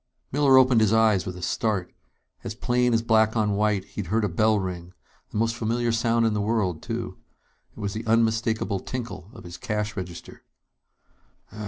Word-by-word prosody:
Miller 135 -1 +5
opened 130 -3 +5
his 110 -2 +3
eyes 110 -4 +3
with 90 -1 -5
a 90 - -8
start. 100 -2 -1 0.5
As 105 - -5
plain 125 +1 +1
as 115 0 +2
black 110 0 +3
on 105 -1 +2
white, 100 -1 +1
he'd 100 -2 -6
heard 110 +5 +1
a 105 - +1
bell 110 +5 +2
ring 90 -2 -5 0.4
the - - -6
most 115 +1 +1
familiar 120 +1 0
sound 115 0 +2
in 110 - +2
the 105 - -1
world, 100 -6 0
too. - - -5 0.5
It - - -15
was 100 -1 -3
the 110 +1 -6
unmistakable 110 -2 +1
tinkle 115 -7 -6
of 115 -2 -13
his 85 0 -9
cash 105 -3 -3
register. 90 -3 -8
110 Hz, 180 wpm, -25 LUFS, 100-115 Hz, 0.5 s, Miller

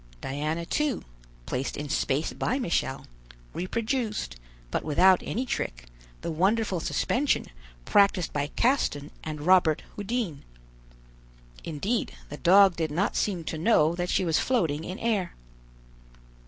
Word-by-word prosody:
Diana 155 - -3
too, 300 - -1 0.4
placed 130 +2 -3
in 145 - -4
space 140 0 0
by 255 - -1
Michel, 170 - -1 0.5
reproduced, 220 +5 -2 0.4
but - - -1
without 180 +5 +5
any 250 +5 -2
trick, - - -3 0.4
the - - -3
wonderful 190 +3 +1
suspension 265 - 0 0.4
practiced 200 -4 +3
by 145 -1 0
Caston 190 - +1
and 155 -1 -5
Robert 175 -4 +4
Houdin. 205 - -3 1.2
Indeed 190 +10 -2 0.2
the 145 - -7
dog 190 +1 +6
did 160 -2 0
not 175 +7 0
seem 185 -5 0
to 160 0 -4
know 165 -5 +4
that 175 0 -3
she 185 - +1
was 160 -2 +2
floating 165 - 0
in 185 - -5
air. 215 -7 -1
180 Hz, 130 wpm, -27 LUFS, 155-215 Hz, 1.2 s, dog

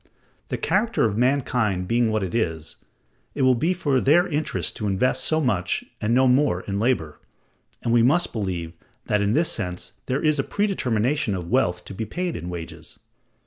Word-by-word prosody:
The - - -3
character 235 - +1
of 105 -3 0
mankind 120 -7 +1
being 115 +1 +2
what 110 -2 0
it 95 - -4
is, 80 -9 -2 0.6
it 140 - 0
will 130 0 +5
be 140 +9 +1
for 145 -8 +1
their 170 +6 +4
interest 155 -1 -2
to 105 - -2
invest 100 +6 +1
so 155 - +1
much 100 - 0 0.2
and 105 - 0
no 130 +2 +4
more 130 -7 +3
in 100 0 -3
labor, 100 - 0 0.6
and 115 - +1
we 120 - +5
must 155 +9 +2
believe 90 -6 -3 0.3
that 105 - +1
in 100 +1 +1
this 160 +5 +2
sense 90 -4 -5 0.2
there 135 +4 -1
is 155 -2 +3
a - - +2
predetermination 135 - 0
of 90 0 -6
wealth 90 -9 +1
to - - -8
be 110 +3 -4
paid 175 - -3
in 85 +2 -5
wages. 85 -2 -8
115 Hz, 185 wpm, -24 LUFS, 95-140 Hz, 0.6 s, will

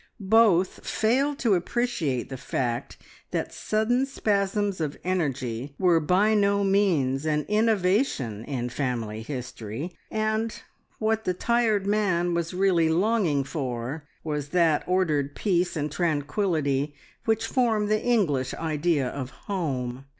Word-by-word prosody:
Both 195 -5 +4
failed 270 +6 +1
to 220 - +5
appreciate 175 - -1
the 135 - -5
fact 120 -2 -3 0.3
that - - -3
sudden 240 +5 +1
spasms 200 -6 0
of 150 -2 -2
energy 140 -7 -2
were 175 -3 +4
by 185 +7 +3
no 200 -1 +3
means 170 -10 +2
an 150 -1 +1
innovation 200 - +1
in 130 -4 -3
the 125 - -5
family 115 -6 -2
history, 125 - -6
and 220 +1 -1 0.4
what 220 0 0
the 180 - 0
tired 225 -2 +1
man 195 -4 +1
was 170 -1 -1
really 180 -3 +2
longing 175 -5 +2
for 135 0 -4 0.2
was 150 -2 -3
that 165 -3 +3
ordered 155 -6 +1
peace 180 -3 +1
and 150 -1 -2
tranquillity 145 -2 0 0.3
which 225 -1 +1
form 230 -5 +1
the 215 +1 +1
English 155 - +1
idea 155 -3 0
of 130 0 -5
home. 135 -9 -4
175 Hz, 130 wpm, -26 LUFS, 140-210 Hz, 0.4 s, to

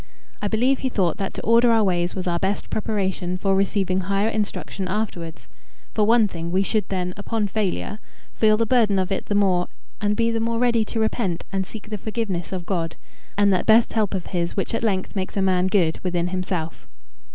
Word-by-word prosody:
I 205 - 0
believe 250 +6 +2
he 260 - -1
thought 185 -9 0
that 195 -1 -2
to - - -5
order 235 +1 +5
our 225 -1 +4
ways 175 -2 0
was 185 - -3
our 170 -1 0
best 195 +3 -2
preparation 190 -4 -1
for 195 +1 +1
receiving 195 -1 +1
higher 195 +3 0
instruction 205 -3 -3
afterwards. 185 -5 -4 0.5
For 210 -1 +2
one 230 -1 +5
thing, 170 -3 -5
we 185 +3 +2
should 215 +1 0
then, 180 -2 -2
upon 215 +1 -1
failure, 200 - -2 0.3
feel 215 -1 +4
the 230 - +2
burden 220 -4 +3
of 190 +1 0
it 195 - -2
the 205 - 0
more, 185 -3 +3 0.3
and 205 0 +1
be 230 0 +2
the 230 - 0
more 230 +1 0
ready 235 -2 +3
to 225 - -3
repent 220 -5 0
and 190 -1 -1
seek 215 -1 -10
the 210 - -3
forgiveness 205 -6 -3
of 185 -2 -4
God, 165 -4 -2 0.4
and 200 -1 +4
that 185 - 0
best 225 +1 +5
help 210 -3 +1
of 185 - -3
his 170 +1 -1
which 195 - -1
at 230 - 0
length 200 -3 -1
makes 190 +1 -3
a - - +2
man 185 -1 +2
good 180 -5 +2
within 175 -1 -1
himself. 180 -3 -3
195 Hz, 210 wpm, -23 LUFS, 185-220 Hz, 0.5 s, order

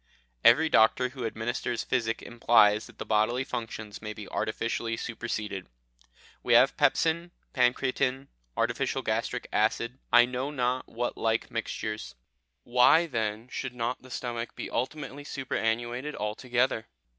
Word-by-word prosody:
Every 150 +8 +7
doctor 125 -1 +4
who 125 -3 -4
administers 115 +2 -2
physic 115 -3 -1
implies 110 -3 +4
that - - -17
the - - -5
bodily 110 +4 +2
functions 110 -4 -6
may 110 0 -5
be 105 -2 -9
artificially 115 +1 -2
superseded. 110 -5 -4 0.7
We - - +1
have - - +6
pepsine, 170 +2 +2 0.2
pancreatine, 130 +1 +1 0.3
artificial - - 0
gastric - - -2
acid 115 +4 +1
I 120 0 +8
know 125 +2 -3
not 130 -2 -1
what 120 +1 -3
like 110 0 0
mixtures. 110 - -4 0.5
Why, 125 +7 +5
then, 110 -5 -2
should 130 -1 -5
not 120 +1 -2
the 130 - -14
stomach 120 -2 -4
be - - -6
ultimately 140 +3 -3
superannuated 120 0 -2
altogether? 120 +2 -1
120 Hz, 130 wpm, -28 LUFS, 110-130 Hz, 0.7 s, I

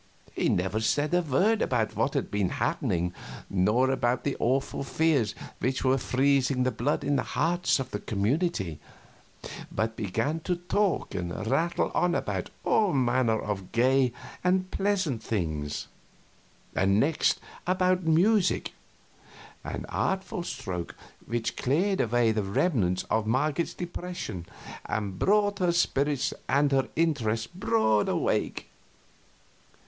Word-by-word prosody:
He - - +1
never 95 +4 0
said 145 +8 +1
a 180 - +4
word 185 - +2
about 115 -4 0
what - - 0
had - - -1
been 100 -3 +1
happening, 90 +1 -1 0.4
nor 105 +8 +3
about 125 -2 0
the 140 - -1
awful 135 +3 0
fears 140 -6 +1 0.2
which 130 +3 -1
were 135 0 +3
freezing 135 0 +2
the 130 - +1
blood 140 +6 -1
in 145 0 +1
the - - +1 0.2
hearts 175 +2 +2
of 135 -2 -5
the 105 - -3
community, 105 - -1 0.9
but 110 +1 -1
began 115 - -1
to 180 +2 -1
talk 180 +3 0
and 90 +2 -4
rattle 170 +9 +1
on 180 -1 +2
about - - -2
all 210 -6 +3
manner 120 -4 +2
of 100 -3 -4
gay 130 +2 +3 0.3
and 185 +1 +1
pleasant 190 - 0
things; 80 -8 -2 0.9
and 100 +2 +3
next 150 +6 +2 0.3
about 185 0 +2
music 180 +5 +2 0.9
an - - -5
artful 190 -1 -1
stroke 95 - -5 0.3
which 115 0 -2
cleared 185 +9 +1
away 120 0 +2
the 110 -1 0
remnant 100 - +1
of 110 -1 +1
Marget's 150 +7 0
depression 175 - -5 0.4
and 100 -4 -3
brought 205 0 +2
her 180 -2 +3
spirits 145 -5 +1 0.2
and 145 +1 +3
her 135 -2 +2
interests 115 -9 +1
broad 110 - +1
awake. - - -1
130 Hz, 130 wpm, -28 LUFS, 110-170 Hz, 0.9 s, a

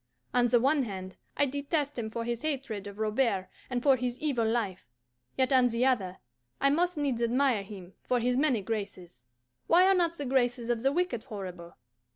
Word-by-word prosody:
On 245 -1 +4
the 240 0 +4
one 275 +4 +3
hand 190 -5 -6 0.2
I 285 - +4
detest 285 +1 -2
him 220 -2 -3
for 230 +1 -4
his 235 -1 -3
hatred 265 -10 -3
of 200 0 -9
Robert 215 -3 0 0.2
and 250 -1 -2
for 275 -2 +6
his 245 0 -3
evil 260 -7 0
life, 205 - -2 0.5
yet 260 +1 +2
on 255 -1 +5
the 235 +1 0
other 195 -9 0 0.4
I 275 0 +3
must 350 +3 +1
needs 275 -5 -1
admire 245 -1 +2
him 195 -2 -10
for 250 - 0
his 245 +1 +1
many 260 -6 +2
graces 185 - -5 0.4
why 355 +2 +6
are 390 - +5
not 345 -3 +2
the 285 - -4
graces 245 -2 +1
of 235 -2 -1
the 270 +2 +2
wicked 330 -8 -1
horrible? 185 -7 -8
245 Hz, 195 wpm, -29 LUFS, 215-275 Hz, 0.5 s, for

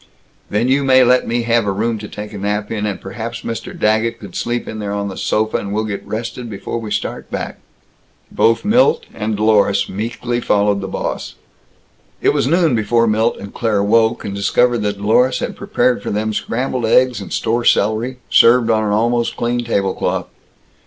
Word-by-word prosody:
"Then 105 +4 +1
you 135 +2 +2
may 130 -1 +5
let 125 +1 +3
me 120 +1 0
have 115 -2 +1
a - - +2
room 110 +3 -1
to 105 - -7
take 105 +1 -8
a - - -6
nap 105 +1 -2
in, 105 -2 -2
and 100 -3 -3
perhaps 115 +4 -6
Mr. 115 0 -6
Daggett 110 +2 +1
could 100 -5 -11
sleep 120 0 -2
in 110 - -6
there 100 -1 -3
on 100 0 -2
the 95 - -7
sofa, 110 +3 0
and 100 - -5
we'll 110 +2 0
get 105 -2 -4
rested 115 +2 -5
before 100 +3 -5
we 110 -2 -6
start - - -4
back." - - -5 0.7
Both 115 - +2
Milt 240 +5 +3
and 105 -1 -3
Dlorus 100 -2 +3
meekly 115 +4 -3
followed 100 -2 +1
the 95 - -4
boss. - - -4 0.8
It - - +2
was - - +1
noon 165 -1 +3
before 115 +2 +2
Milt 110 +1 +1
and 100 0 -9
Claire 105 -4 0
woke, 110 +2 +2
and 100 - -4
discovered 120 +5 +2
that 105 -1 -2
Dlorus 125 +5 +2
had - - -4
prepared 125 -2 0
for - - -5
them 110 +1 -1
scrambled 125 +2 -2
eggs 125 -1 +3
and 100 - -9
store 120 +2 0
celery, 115 +4 +1
served 115 -1 +5
on 110 -1 +2
an 105 - 0
almost 120 +2 +1
clean 120 +1 -1
table 100 -5 0
cloth. - - -2
110 Hz, 195 wpm, -18 LUFS, 105-120 Hz, 0.8 s, may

